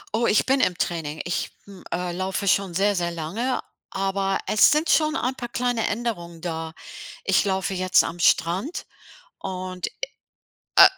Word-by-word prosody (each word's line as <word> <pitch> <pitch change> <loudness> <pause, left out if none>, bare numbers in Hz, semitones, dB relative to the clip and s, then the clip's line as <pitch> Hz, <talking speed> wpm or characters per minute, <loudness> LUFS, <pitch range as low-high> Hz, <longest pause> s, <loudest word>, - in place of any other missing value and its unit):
Oh, 235 +1 +2
ich 210 - +4
bin 270 +1 +3
im 180 -8 +2
Training. 160 -3 -2
Ich, 175 - -1 0.2
hm, 195 -2 -13
äh, 180 0 -1
laufe 190 +3 -2
schon 195 -2 +2
sehr, 200 +2 +3
sehr 175 -2 0
lange, 170 +10 -2 0.3
aber 195 0 0
es 215 - +6
sind 305 +2 +2
schon 310 0 +3
ein 255 -4 0
paar 240 -2 -6
kleine 245 -2 0
Änderungen 200 -7 -3
da. 160 -1 -4 0.5
Ich 195 - +3
laufe 190 0 0
jetzt 185 0 +4
am 170 +1 -5
Strand 180 - +2 0.5
und, 185 -1 -4 0.9
äh, - - +11
190 Hz, 160 wpm, -24 LUFS, 175-225 Hz, 0.9 s, äh